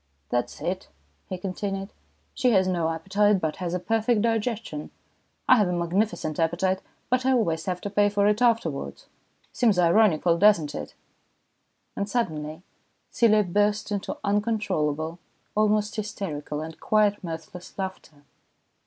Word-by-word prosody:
" 70 +1 -44
That's 120 0 -2
it," 185 +2 -3 0.4
he 185 - -3
continued. 195 +1 -4 0.2
" - - -42
She 255 -2 +2
has 190 -2 +4
no 170 -3 0
appetite, 195 +5 +2
but 160 -3 -2
has 180 -1 -3
a - - -1
perfect 225 +3 +1
digestion. 225 -8 -2 0.6
I 255 - +7
have 210 -4 +3
a 180 - -1
magnificent 175 -2 -1
appetite, 180 +3 +1 0.3
but 255 0 +2
I 265 0 +3
always 165 -10 +1
have 180 -1 -2
to 205 - -4
pay 205 0 +3
for 200 0 +1
it 210 +2 +2
afterwards. 225 - 0 0.5
Seems 225 -6 +2
ironical, 170 -2 +4
doesn't 185 -7 +4
it? 75 -1 -7 0.5
" - - -47
And 200 +1 -2
suddenly 160 -8 -2 0.5
Celia 215 -3 +4
burst 205 +3 0
into 200 -1 -3
uncontrollable, 180 -7 0 0.3
almost 210 0 +2
hysterical, 165 -8 -4
and 160 0 -8
quite 210 -2 +2
mirthless 165 +1 -8
laughter. 185 -6 -6
190 Hz, 145 wpm, -26 LUFS, 165-210 Hz, 0.6 s, I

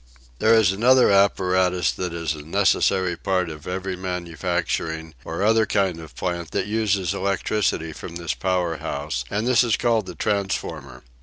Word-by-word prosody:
There 110 +1 +5
is 110 -5 +4
another 125 +4 +4
apparatus 95 -3 +3
that 90 -2 -4
is 85 -2 -2
a 75 - -8
necessary 95 +1 +2
part 90 -2 -1
of 75 -1 -10
every 95 +1 -3
manufacturing 85 -2 -3
or 80 +6 -3
other 110 0 +3
kind 95 -5 0
of 80 -1 -12
plant 85 -3 -3
that - - 0
uses 105 -4 0
electricity 95 -3 -1
from 85 +2 -9
this 85 -3 -2
power 85 +5 -1
house, 70 -4 -4
and 105 +3 -1
this 125 -1 +4
is 115 -3 +1
called 115 -5 +1
the 90 - -7
transformer. 80 -9 -3
90 Hz, 160 wpm, -23 LUFS, 80-100 Hz, -, There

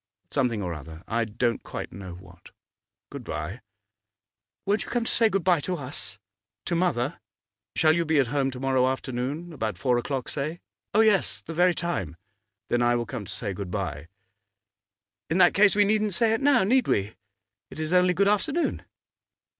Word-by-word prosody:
'Something 120 -7 0
or 90 -2 -3
other, 80 +2 -10
I 115 +1 0
don't 115 +2 -1
quite - - -6
know 95 -3 -8
what. 90 -1 -15 0.6
Good - - -7
bye!' 90 +11 -5 1.0
'Won't 205 +2 +1
you - - -10
come 240 -1 0
to - - -2
say 225 -1 +4
good 195 -3 0
bye 180 -2 +4
to 180 +5 -2
us 125 - -4 0.5
to 175 - -2
mother?' 165 -5 0 0.6
'Shall 155 0 +4
you 170 - +2
be 160 -1 +1
at 140 - +4
home 135 -2 +1
to 130 -1 -7
morrow 130 -1 +2
afternoon, 130 +6 -3
about 110 - -3
four 120 +6 +2
o'clock 130 0 -3
say?' 155 +4 -3 0.4
'Oh, 220 - +6
yes; 215 -4 +3
the 165 - -7
very 175 +1 +3
time.' 95 - -3 0.5
'Then 120 - +2
I 120 0 +3
will 120 0 -1
come 115 -5 -6
to - - -8
say 100 -3 -4
good 95 0 -6
bye.' 80 -6 -4 1.2
'In 160 - +1
that 175 -2 +6
case 200 0 +5
we 205 0 +5
needn't 210 -2 +1
say 225 +2 +3
it 225 - 0
now, 275 -6 +4
need 250 +6 +3
we? 100 +2 0 0.6
It - - -10
is 155 +2 -2
only 180 0 +4
good 200 +2 +3
afternoon. 280 - +1
140 Hz, 185 wpm, -26 LUFS, 110-185 Hz, 1.2 s, Oh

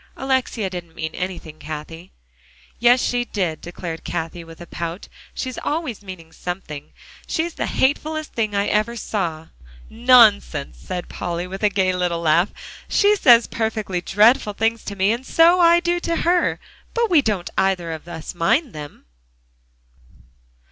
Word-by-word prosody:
Alexia 260 -5 0
didn't 175 -3 -8
mean 160 0 -4
anything, 180 -4 -6
Cathie." 155 +3 -8 0.7
"Yes, 240 +2 +5
she 245 0 0
did," 185 -9 -3
declared 170 -1 -7
Cathie 165 +1 -4
with 165 0 -13
a 175 - -9
pout; 170 +3 -6 0.3
"she's 255 -1 -4
always 295 -9 -3
meaning 185 -5 -10
something. 160 -5 -7 0.4
She's 330 +1 -1
the - - -3
hatefullest 310 +3 0
thing 215 -3 -1
I 200 0 +1
ever 215 +3 0
saw!" 170 -8 -3 0.4
"Nonsense!" 220 - +4
said 180 -1 -5
Polly, 175 0 -4
with 190 +2 -7
a 210 - +4
gay 190 -2 +1
little 175 -2 -1
laugh. 170 +4 +3 0.4
"She 415 0 +4
says 240 - +6
perfectly 215 -5 -2
dreadful 210 +3 +3
things 225 +2 0
to 200 - -5
me, 195 +2 +2
and 235 +3 -2
so 335 +6 +5
I 340 0 +6
do 345 0 0
to 335 -1 -2
her, 350 +1 +2 0.4
but 465 -3 +1
we 320 -4 +6
don't 205 -8 -2
either 190 -3 +1
of 160 +1 -7
us 160 -2 -7
mind 230 - +1
them." 150 -1 -9
200 Hz, 155 wpm, -21 LUFS, 170-245 Hz, 0.7 s, says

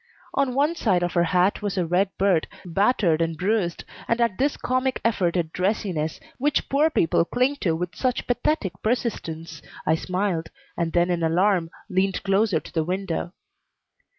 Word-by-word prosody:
On 270 -3 +1
one 290 +4 +3
side 195 - +1
of 175 - -1
her 170 -1 +3
hat 180 +4 +2
was 205 -1 -2
a 180 - +1
red 180 +4 +2
bird, 190 -4 +2 0.2
battered 180 -2 +2
and 165 -1 -1
bruised, 185 -2 0 0.2
and 230 - +1
at 230 -4 +1
this 285 +2 +1
comic 255 +1 0
effort 185 -6 +1
at 165 -2 -2
dressiness, 180 -5 -1 0.2
which 290 +3 +1
poor 295 +3 +3
people 165 - +2
cling 255 +9 0
to 170 -10 0
with 175 0 -4
such 255 +7 -1
pathetic 245 - 0
persistence, 165 - -2 0.2
I 155 - +3
smiled, 180 0 -1 0.3
and 170 -1 -1
then 175 +1 +2
in 175 -1 0
alarm 175 +1 +2 0.2
leaned 190 -1 0
closer 200 +2 +2
to - - -13
the 160 - +1
window. 180 0 -3
185 Hz, 170 wpm, -24 LUFS, 170-230 Hz, 0.3 s, one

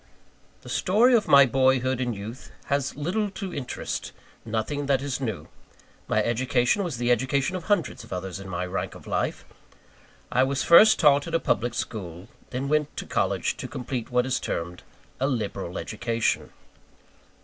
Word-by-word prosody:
The - - -10
story 225 +7 +3
of 230 -3 +3
my 140 -1 +8
boyhood 130 0 +2
and 120 -3 -1
youth 110 +6 -8 0.2
has 140 -2 -1
little 185 +9 -1
to 190 -4 -5
interest 130 -4 -4 0.3
nothing 115 +6 -2
that 135 -2 +3
is 140 -2 -3
new. 110 -7 -4 0.6
My 110 - +2
education 125 - +1
was 165 -9 -3
the 120 +1 +1
education 130 +7 +1
of 180 -2 -5
hundreds 205 -5 0
of - - -15
others 95 0 -4
in 95 0 -9
my 90 0 -2
rank 90 +2 -4
of - - -13
life. - - -2 0.9
I 125 - +3
was 135 0 +1
first 210 +6 +8
taught 145 -1 +4
at 165 - -2
a - - +3
public 120 -2 0
school, 90 -7 -4
and 95 - -16 0.2
then 130 +2 -3
went 150 0 0
to - - -4
college - - 0
to - - -5
complete 125 -1 -5
what 125 0 +2
is 130 0 0
termed 85 +1 -4 0.4
"a 135 - +1
liberal 100 -8 -3
education." 115 +1 -1
130 Hz, 170 wpm, -26 LUFS, 110-145 Hz, 0.9 s, my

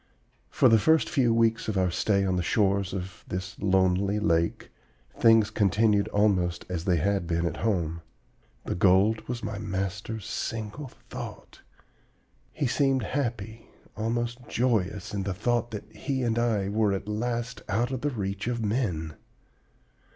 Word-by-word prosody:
"For - - +4
the 115 -2 +6
first 160 +7 +3
few 130 -8 +3
weeks 115 0 +2
of 105 -3 -1
our 90 -1 +2
stay 100 +2 +1
on 95 -1 +1
the 90 - +1
shores 100 0 +1
of 95 -2 -6
this 90 +2 -5
lonely 95 +1 +2
lake, 85 -5 0 0.4
things 115 -2 +5
continued 105 0 +2
almost 95 -5 +1
as 90 -2 -3
they 90 -3 +3
had 95 +2 0
been 85 0 0
at 85 -1 -2
home. 85 -7 -1 0.6
The - - -2
gold 95 +5 +4
was 120 -2 -4
my 105 -1 -4
master's 100 +2 -4
single 110 +5 -4 0.2
thought. - - -8 0.9
He 145 - -2
seemed 135 +1 +2
happy, 115 -4 -3 0.3
almost 120 +2 -2
joyous, 105 -4 0
in 100 - -1
the 95 -1 -3
thought 120 +3 0
that 105 -3 -6
he 130 +3 -2
and 115 -1 +1
I 110 -5 +1
were 105 0 +1
at 95 - -4
last 115 +2 -3
out 120 +5 0
of 130 -2 -3
the 145 - 0
reach 100 -4 -3
of 120 -2 -1
men. 95 -9 -1
105 Hz, 155 wpm, -27 LUFS, 95-115 Hz, 0.9 s, the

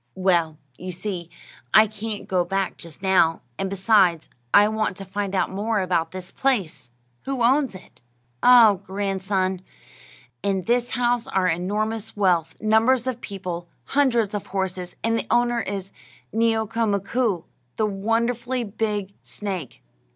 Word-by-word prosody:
"Well, 170 -4 +1 0.2
you 185 0 -5
see, 180 -2 -5 0.5
I 215 +1 +9
can't 215 0 -6
go 185 -2 +2
back 195 +1 -2
just 170 +2 -11
now; 185 -4 +3 0.2
and 195 - -1
besides, 190 -4 +3 0.2
I 205 +1 +7
want 215 -2 -1
to 195 - -7
find 200 0 -3
out 185 - +1
more 210 +3 -1
about 180 -3 0
this 185 -1 -8
place. 175 - -1 0.4
Who 270 -3 -1
owns 265 -1 +3
it?" 185 - -14 0.4
"Ah, 240 -4 +8
grandson, 190 -1 -2 0.8
in 195 -2 0
this 240 +2 +1
house 245 0 +1
are 190 -8 +1
enormous 210 +6 -1
wealth, 180 -5 +2
numbers 225 +4 +3
of 250 -2 -3
people, 180 -4 -5 0.2
hundreds 240 -7 +1
of 205 - -4
horses, 185 -2 -3
and 230 0 +1
the - - -5
owner 240 0 +2
is 195 -1 -5 0.4
Neeo'ka 225 0 +1
Mkoo', 200 -1 0 0.3
the 220 - +1
wonderfully 235 +5 -1
big 210 -2 -3
snake. 190 - -6
200 Hz, 140 wpm, -23 LUFS, 185-225 Hz, 0.8 s, I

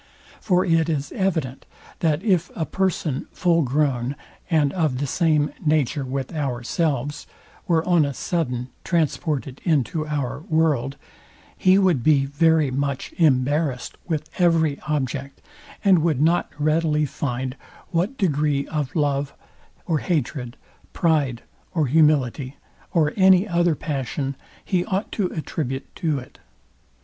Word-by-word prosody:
For 185 -2 +2
it 165 -2 +2
is 145 -2 -2
evident, 160 -9 -2 0.3
that 160 +1 +1
if 185 -6 +2
a 160 - -1
person 175 -8 -1
full 170 -2 +2
grown, 135 -2 0 0.3
and 150 -5 +2
of 155 -8 0
the 145 - -1
same 150 0 +1
nature 150 -3 +1
with 130 +1 -4
ourselves, 140 0 -2 0.4
were 165 -1 +2
on 175 -3 +4
a 140 -2 -2
sudden 125 -8 -2
transported 150 -5 -1
into 155 0 0
our 145 -4 -2
world, 150 -5 +1 0.6
he 185 +1 +4
would 185 -9 +3
be 145 -3 +4
very 155 0 +2
much 140 0 -2
embarrased 140 -2 +1
with 155 -3 -2
every 165 -4 +3
object, 140 -2 -2 0.5
and 190 -3 +6
would 155 -4 +1
not 165 +4 +2
readily 155 0 +2
find 130 -2 -3 0.4
what 185 +10 0
degree 150 -6 +1
of 150 +1 -3
love 145 -2 0 0.5
or 160 -4 +1
hatred, 135 -7 -2 0.4
pride 150 -9 +1 0.3
or 160 -3 +2
humility, 140 -2 +2 0.3
or 155 -3 +2
any 190 +1 +5
other 175 -3 +2
passion 135 -1 -3 0.3
he 180 -3 +1
ought 195 +3 -2
to 200 -4 0
attribute 140 -5 -4
to 155 -4 0
it. 125 - -10
150 Hz, 130 wpm, -23 LUFS, 135-165 Hz, 0.6 s, and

